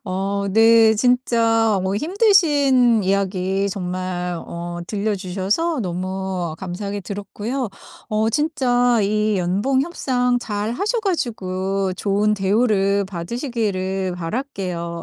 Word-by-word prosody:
어 200 +1 -2
네. 225 +1 +6
진짜 230 -2 +2
어 190 +1 -1
힘드신 290 - +3
이야기 195 0 0
정말 180 -2 -3
어 175 0 -6
들려주셔서 205 - -1
너무 185 -2 -3
감사하게 200 +2 -5
들었고요. 210 +6 -4 0.4
어 220 +1 +1
진짜 245 -5 +2
이 210 +1 +1
연봉 205 +10 +1
협상 250 -7 0
잘 215 -1 -3
하셔 430 - -1
가지고 195 - -2
좋은 205 +2 +1
대우를 200 0 +2
받으시기를 190 - -3
바랄게요. 175 -4 -4
205 Hz, 230 characters per minute, -21 LUFS, 190-245 Hz, 0.4 s, 네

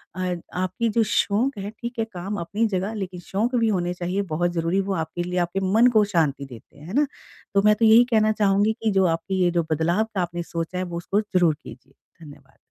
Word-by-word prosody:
अ, 185 -1 -2 0.2
आपकी 185 +5 -1
जो 225 +1 +2
शौक 215 +5 +1
है, 200 0 -5
ठीक 235 +2 -7
है 225 - +1
काम 190 +3 -4
अपनी 205 +7 -1
जगह 195 +1 -2
लेकिन 190 -4 -5
शौक 215 +8 -2
भी 230 -2 +2
होने 180 -4 0
चाहिए 180 +3 -2
बहुत 175 +2 +1
ज़रूरी 170 +2 0
वो - - +1
आपके 175 0 -3
लिए, 180 +1 -2
आपके 175 +2 -1
मन 235 +3 +6
को 210 - +6
शांति 145 -5 +1
देते 125 +1 -14
हैं। 150 +3 -12
है 185 - -7
ना? 290 +4 +3 0.5
तो 200 - +4
मैं 210 0 +6
तो 225 +1 +2
यही 225 +2 +8
कहना 215 -1 +4
चाहूँगी 205 0 +2
कि 220 - +2
जो 190 -1 +3
आपकी 175 +3 -1
ये 175 - +3
जो 170 -1 +1
बदलाव 170 +7 +2
का 185 - +1
आपने 175 0 -3
सोचा 170 +2 -4
है 185 - -1
वो 175 -2 -5
उसको 195 +4 0
ज़रूर 180 -6 +2
कीजिए। 135 +2 -13 0.3
धन्यवाद। 145 -1 -16
185 Hz, 230 wpm, -23 LUFS, 175-210 Hz, 0.5 s, यही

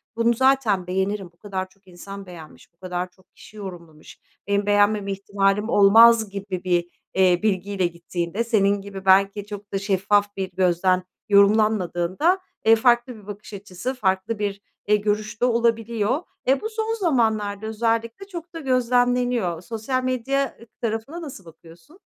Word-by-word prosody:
bunu 230 +1 +2
zaten 235 -8 +2
beğenirim, 190 +1 -2
bu - - -34
kadar 190 -2 -5
çok 195 0 -30
insan 195 +3 -10
beğenmiş, 170 -2 -13
bu - - -47
kadar 180 0 -4
çok 185 0 -29
kişi 215 - -15
yorumlamış, 170 -6 -10 0.3
benim 200 0 +1
beğenmeme 205 0 +2
ihtimalim 200 +2 0
olmaz 220 +2 +6
gibi 195 -2 -5
bir, 175 -1 +1 0.3
eee, 185 -2 +4
bilgiyle 195 -2 0
gittiğinde 170 +4 -4
senin 205 -3 +2
gibi 195 -1 -9
belki 195 +1 +4
çok 205 -1 -9
da 195 - 0
şeffaf 205 +1 +1
bir 190 -1 -3
gözden 185 0 +2 0.3
yorumlanmadığında, 205 - +3 0.2
e, 225 +1 +6
farklı 240 +2 +2
bir 210 -2 -15
bakış 205 0 -9
açısı, 200 +5 -5
farklı 205 -2 -1
bir, 200 -1 -3 0.2
e, 210 - +4
görüş 210 +1 -2
de 245 - +4
olabiliyor. 235 - +1 0.3
E, 270 +1 +3
bu 440 - -3
son 445 0 -2
zamanlarda 220 - 0
özellikle 230 - -2
çok 345 -3 -9
da 330 - -6
gözlemleniyor. 245 - +1
Sosyal 230 +5 -3
medya 255 +1 -1 0.2
tarafına 230 +9 -3
nasıl 260 - -9
bakıyorsun? 170 - -17
205 Hz, 150 wpm, -23 LUFS, 190-235 Hz, 0.3 s, olmaz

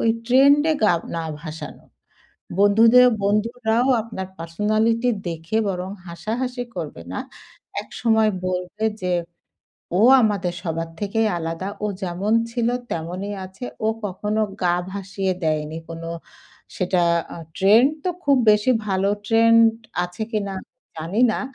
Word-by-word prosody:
ওই 230 - +2 0.2
ট্রেন্ড 275 +4 +6
এ - - 0
গা 210 - +5 0.2
না 165 - -2 0.2
ভাসানো। 160 -1 -8 0.8
বন্ধুদের 225 +5 +6 0.2
বন্ধুরাও 225 +4 +1
আপনার 215 -4 -6
পার্সোনালিটি 215 +8 +1 0.2
দেখে 165 +5 -3
বরং 185 -1 -3 0.2
হাসাহাসি 245 +8 -3
করবে - - -6
না। - - -3 0.6
একসময় 220 -2 +1 0.2
বলবে 180 +4 -3 0.2
যে, 180 0 -1 0.9
"ও - - +3 0.2
আমাদের 200 -5 0
সবার 165 0 -3
থেকেই 215 +2 +1
আলাদা, 165 +3 -4 0.2
ও - - +2 0.2
যেমন 185 +4 -1 0.2
ছিল 235 0 0 0.2
তেমনই 180 +5 -4
আছে, 190 +5 -10 0.2
ও - - +3 0.2
কখনো 210 +3 -1 0.2
গা 175 -1 +3 0.2
ভাসিয়ে 195 -1 -2
দেয়নি।" 155 0 -1
কোনো 165 0 -7 0.7
সেটা 180 -1 +1 0.3
আ - - -8 0.2
ট্রেন্ড 220 +8 +5
তো 365 - +1
খুব 280 -1 +4
বেশি 210 +4 +3 0.2
ভালো 195 0 +1 0.2
ট্রেন্ড 230 +1 +5 0.4
আছে 180 +5 -5
কিনা 200 -2 -1
আমি - - -19 0.3
জানি 165 +8 -2
না। - - -2
205 Hz, 130 wpm, -22 LUFS, 180-225 Hz, 0.9 s, ট্রেন্ড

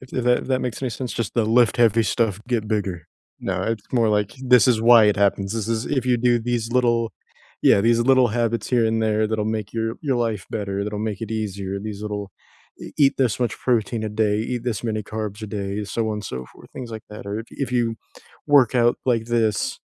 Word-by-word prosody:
If 130 - -13
th 125 - -2
that, 125 0 +2
that 130 -1 +1
makes 125 0 -4
any 130 - -1
sense, 125 +2 -5
just 115 -4 -3
the 115 - +2
"Lift 120 +2 +3
heavy 115 -2 +4
stuff, 105 -3 0
get 115 -3 0
bigger." 100 -6 -2 0.3
No, - - -2
it's 115 -2 -2
more, 115 -3 +3
like, 105 -1 +1
"This 125 -1 +5
is 115 -3 +2
why 115 -1 +7
it 105 -1 +3
happens; 100 0 +1
this 115 -1 -3
is 115 0 -1
if 130 -4 -1
you 125 -1 +2
do 120 0 +2
these 120 -1 -2
little 120 -2 +2 0.5
yeah, 100 - +5
these 115 +2 +3
little 130 0 +4
habits 115 +1 -1
here 120 -3 +3
and 110 0 0
there 110 0 +1
that'll 110 -1 -1
make 105 -1 -8
your 115 -1 -1
your 135 -4 0
life 115 -4 -2
better, 100 -2 -3
that'll 105 0 -4
make 100 - -7
it 115 -1 -5
easier, 100 -3 -3
these 105 -1 -6
little 105 -2 -5 0.5
e - - -8
eat 140 -2 +5
this 120 -6 +1
much 120 -2 0
protein 115 -2 0
a 110 - -2
day, 105 -1 +1 0.2
eat 120 - -5
this 115 -5 -2
many 110 -2 -1
carbs 110 -1 -5
a 110 - -4
day, 100 0 -4
so 110 +3 -2
on 105 -1 -4
so 65 -10 -6
forth," - - -17
things 125 -3 -7
like 110 -1 -7
that, 105 - -9
or 105 +3 -4 0.2
if 135 - -1
you 120 -2 +1 0.5
work 135 -4 +5
out 120 -1 +3
like 115 -3 +1
this, 115 -3 0
115 Hz, 230 wpm, -22 LUFS, 105-120 Hz, 0.5 s, why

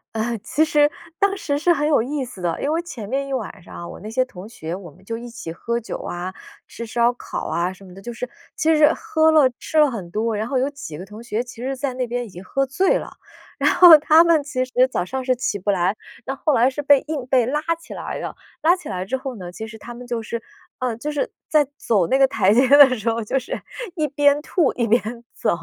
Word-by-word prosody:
呃， 230 +2 -1
其 295 +9 +1
实 295 -1 +4 0.3
当 395 0 +2
时 285 -4 -1
是 345 +3 +3
很 295 -2 +2
有 290 -7 +4
意 270 +2 -2
思 220 -7 -11
的。 170 -2 -1
因 290 - 0
为 330 +2 +1
前 245 - -8
面 275 +3 -2
一 275 - -4
晚 210 -6 -4
上 - - -13
啊， 170 - -7
我 - - -9
那 215 - -8
些 255 +3 +1
同 200 -3 -11
学， 165 -6 -6
我 185 -2 -9
们 185 +2 -20
就 230 +1 -4
一 240 0 -8
起 165 -8 -7
喝 235 +7 -2
酒 230 - -6
啊、 180 +2 -5 0.3
吃 235 - -8
烧 235 +2 +2
烤 - - -6
啊 175 +2 -1
什 190 +1 -14
么 180 - -13
的。 195 - -12
就 240 - -6
是 250 +2 -5 0.3
其 320 0 +3
实 300 0 +6
喝 320 -8 +2
了、 285 -5 +5
吃 315 - -3
了 300 -3 +6
很 190 -7 -6
多， 220 +3 -1
然 215 +2 -2
后 265 +1 -1
有 260 +2 +2
几 275 - -8
个 185 - -8
同 210 +3 -11
学 235 0 -2
其 240 -1 -11
实 265 +1 -3
在 265 -1 -2
那 250 -1 -2
边 245 +1 -3
已 220 - -11
经 180 +1 -11
喝 275 +8 0
醉 370 +9 +2
了。 - - -8 0.4
然 - - +4
后 345 -3 +10
他 310 +2 +6
们 335 -3 +4
其 275 -3 -2
实 255 - -9 0.2
早 - - -1
上 260 +8 -4
是 255 -1 +2
起 240 -5 -2
不 205 - -3
来， 190 +1 +2 0.3
那 270 - -2
后 300 +2 0
来 250 +1 +4
是 295 +2 -4
被 285 -1 +5
硬 285 -5 -4
被 255 -3 +3
拉 295 +4 0 0.2
起 335 - -11
来 - - -5
了。 - - -5 0.3
拉 335 +3 +5
起 360 - -11
来 185 -2 -3
之 265 +6 -2
后 260 -1 -6
呢， 180 -3 -8
其 220 +4 -7
实 220 0 -10
他 240 +3 -9
们 245 +1 -10
就 235 -2 -3
是， 230 0 -4 0.4
呃， 250 -3 -1
就 295 +6 -4
是 290 - -1 0.2
在 300 -3 +4
走 200 -7 +1
那 265 - +3
个 275 - +6
台 210 -6 +2
阶 255 +4 +5
的 280 -3 +8
时 220 +1 -1
候 230 0 -1
就 220 +5 -1
是 255 - -4 0.3
一 305 -2 0
边 290 +1 +3
吐 325 -3 +1
一 235 -2 0
边 235 +3 +4 0.3
走， 220 - -1
250 Hz, 285 characters per minute, -22 LUFS, 220-290 Hz, 0.4 s, 后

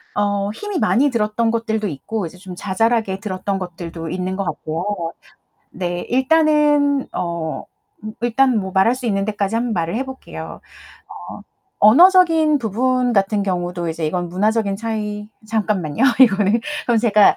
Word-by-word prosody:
어. 205 -1 0
힘이 405 - -4
많이 280 +4 +3
들었던 225 -1 0
것들도 220 -2 -1
있고 195 +6 -4
이제 170 +2 -9
좀 180 0 -10
자잘하게 205 +1 0
들었던 195 -1 -3
것들도 170 -2 -7
있는 185 +2 -3
것 195 - -2
같고요. 170 +2 -4 0.6
네, 175 -1 -3
일단은 295 0 +3
어, 170 -2 -3 0.4
음 215 0 -6
일단 245 +1 +2
뭐 190 -1 -5
말할 195 +6 +3
수 255 - -7
있는 195 -3 0
데까지 205 0 -2
한번 235 0 -1
말을 170 +1 -2
해 265 - -2
볼게요. 265 0 -9 0.7
어, - - -9 0.4
언어적인 325 - +6
부분 250 +2 0
같은 200 0 +1
경우도 175 -2 -2
이제 160 -1 -3
이건 175 +2 -2
문화적인 205 +2 0
차이 210 -1 -4 0.2
잠깐만요, 210 - -1 0.2
이거는 210 -1 +4 0.3
그럼 235 -2 +3
제가 215 -3 +4
210 Hz, 310 characters per minute, -19 LUFS, 185-240 Hz, 0.7 s, 언어적인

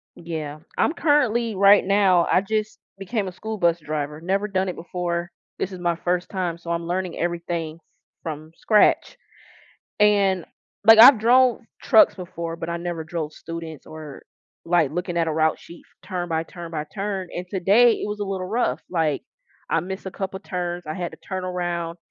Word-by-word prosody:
Yeah, 155 -3 -6 0.2
I'm - - +2
currently 240 -9 +2
right 200 +1 +6
now, 195 -3 +4
I 180 - +4
just 215 +2 -2 0.2
became 200 +1 -2
a - - -4
school 220 +4 -6
bus 170 -3 +2
driver, 150 -1 -4
never 195 +4 0
done 190 -2 -1
it 180 - -3
before. 175 0 -3 0.3
This 190 - -3
is 185 - -8
my 175 -1 0
first 175 +1 -2
time, 180 -4 -2
so 170 0 -7
I'm 170 0 -2
learning 180 0 -2
everything 170 -2 -3 0.5
from 155 0 -6
scratch. 215 -2 +3 0.8
And, 200 -4 +3 0.4
like, 225 0 +9
I've 240 +2 +10
drove 245 +1 +4 0.2
trucks 220 - +6
before, 170 -3 -6
but, 165 0 -6
I 170 - -2
never 170 -1 -4
drove 160 -1 -4
students 165 -1 -8
or, 155 -3 -10 0.4
like, 165 -4 +3
looking 175 +1 -3
at 165 -1 +1
a - - -1
route 155 0 +1
sheet 170 - -13 0.2
turn 180 -2 -4
by 160 -1 0
turn 170 0 -9
by 155 -2 -3
turn. 195 -2 -3
And 180 +1 -5
today 205 +6 +5
it - - -4
was 210 0 -5
a - - 0
little 190 -2 -3
rough, 185 - 0
like, 160 -5 0 0.5
I 165 - +2
missed 190 +3 -7
a - - -3
couple 190 0 -5
of - - -27
turns, 175 -1 -4
I 155 - -4
had 175 -2 -4
to - - -12
turn 185 -1 -4
around, 175 -2 -3
175 Hz, 185 wpm, -23 LUFS, 165-195 Hz, 0.8 s, I've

